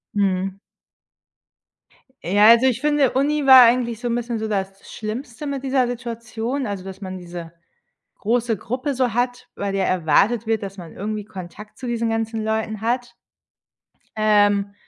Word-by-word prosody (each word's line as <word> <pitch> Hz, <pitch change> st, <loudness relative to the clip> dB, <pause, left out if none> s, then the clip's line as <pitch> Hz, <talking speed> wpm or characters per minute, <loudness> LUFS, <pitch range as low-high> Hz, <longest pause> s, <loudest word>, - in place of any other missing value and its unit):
Mhm. 195 Hz, -1 st, 0 dB, 1.6 s
Ja, 205 Hz, +4 st, +4 dB
also, 235 Hz, +2 st, +7 dB
ich 260 Hz, -1 st, +1 dB
finde, 295 Hz, -3 st, +2 dB
Uni 290 Hz, +2 st, +1 dB
war 260 Hz, -2 st, +10 dB
eigentlich 235 Hz, -1 st, +2 dB
so 245 Hz, -, -3 dB
'n 235 Hz, -, 0 dB
bisschen 235 Hz, -1 st, -3 dB
so 220 Hz, -, -3 dB
das 195 Hz, -2 st, -3 dB
Schlimmste 230 Hz, +5 st, -6 dB
mit 275 Hz, -1 st, -4 dB
dieser 260 Hz, -2 st, +1 dB
Situation, 235 Hz, +2 st, -4 dB
also, 200 Hz, -4 st, -4 dB
dass 190 Hz, +1 st, -9 dB
man 185 Hz, -1 st, -6 dB
diese 175 Hz, -2 st, -8 dB, 0.7 s
große 230 Hz, +1 st, 0 dB
Gruppe 255 Hz, +8 st, -3 dB
so 250 Hz, -3 st, 0 dB
hat, 245 Hz, +1 st, -1 dB
bei 200 Hz, 0 st, -3 dB
der 195 Hz, -1 st, 0 dB
erwartet 190 Hz, +7 st, +2 dB
wird, 220 Hz, -1 st, 0 dB
dass 195 Hz, 0 st, -6 dB
man 170 Hz, -3 st, -9 dB
irgendwie 210 Hz, +1 st, -4 dB
Kontakt 200 Hz, +1 st, -10 dB
zu 255 Hz, -, -7 dB
diesen 230 Hz, -1 st, -1 dB
ganzen 225 Hz, 0 st, -2 dB
Leuten 220 Hz, -1 st, -2 dB
hat. 245 Hz, +2 st, -2 dB, 1.0 s
Ähm, 205 Hz, -2 st, +3 dB
225 Hz, 155 wpm, -22 LUFS, 200-245 Hz, 1.6 s, war